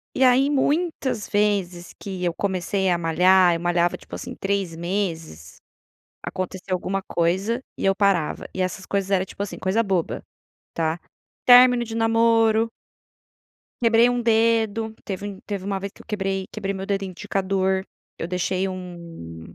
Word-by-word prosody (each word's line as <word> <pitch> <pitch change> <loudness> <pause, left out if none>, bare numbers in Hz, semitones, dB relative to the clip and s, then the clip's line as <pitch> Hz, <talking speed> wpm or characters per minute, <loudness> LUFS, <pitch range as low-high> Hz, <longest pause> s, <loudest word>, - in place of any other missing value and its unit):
E 265 - +3
aí 260 +3 +5
muitas 285 -5 0
vezes 195 -4 0
que 190 -2 -5
eu 175 - +1
comecei 190 0 -1
a 175 - +2
malhar, 180 +2 +4
eu 165 - -3
malhava 175 0 +1
tipo - - -12
assim - - -6
3 195 -3 -2
meses, 165 - -4 0.6
acontecia 185 0 -5
alguma 190 +2 -1
coisa, 190 +9 0
e - - -5
eu 195 - +4
parava 195 -6 +1
e 190 - -4
essas 185 +1 -4
coisas 195 -1 -1
era 190 -2 +2
tipo 200 - -6
assim 200 - -5
coisa 190 +5 +1
boba, 190 -6 -1 0.5
tá? 165 0 0 0.5
Término 245 -1 +8
de 225 0 -6
namoro 225 0 +3 1.1
quebrei 230 +1 +5
um 245 0 0
dedo, 225 -1 +2
teve 200 -1 -5
um 200 -2 -7
teve 200 -3 -4
uma 195 -1 -1
vez 200 +1 -6
que - - -15
eu - - -27
quebrei 195 -3 -2
quebrei 200 -2 -3
meu 190 0 -5
dedo 195 0 -1
indicador, 190 0 -1 0.3
eu - - -3
deixei 185 +1 -1
um 170 - -9
195 Hz, 155 wpm, -23 LUFS, 180-220 Hz, 1.1 s, Término